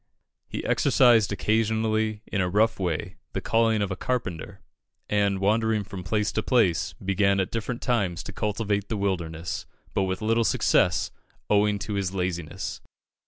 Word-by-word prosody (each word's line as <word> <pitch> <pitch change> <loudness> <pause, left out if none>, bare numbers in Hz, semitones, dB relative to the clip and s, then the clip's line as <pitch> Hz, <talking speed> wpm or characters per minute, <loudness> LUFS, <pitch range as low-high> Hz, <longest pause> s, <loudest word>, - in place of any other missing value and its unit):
He - - -5
exercised 115 -6 +4
occasionally 110 0 0
in 100 - -1
a 90 - 0
rough 105 +4 +2
way 85 -5 -2 0.2
the - - -1
calling 115 -2 +2
of 100 - -3
a - - -1
carpenter, 90 -8 -3 0.5
and, 100 -1 +1
wandering 110 +2 +1
from 95 -1 -8
place 105 +4 0
to - - -1
place, 110 - +2
began 100 0 +1
at 95 - -1
different 115 +2 -3
times 95 - 0
to - - -8
cultivate 105 -1 -1
the 110 - -1
wilderness, 85 -4 -3 0.3
but 95 - +1
with 95 +3 -3
little 115 +2 +2
success, - - +2 0.4
owing 105 0 +3
to 105 +2 -5
his 100 -1 -2
laziness. 90 -4 -3
100 Hz, 155 wpm, -26 LUFS, 95-110 Hz, 0.5 s, exercised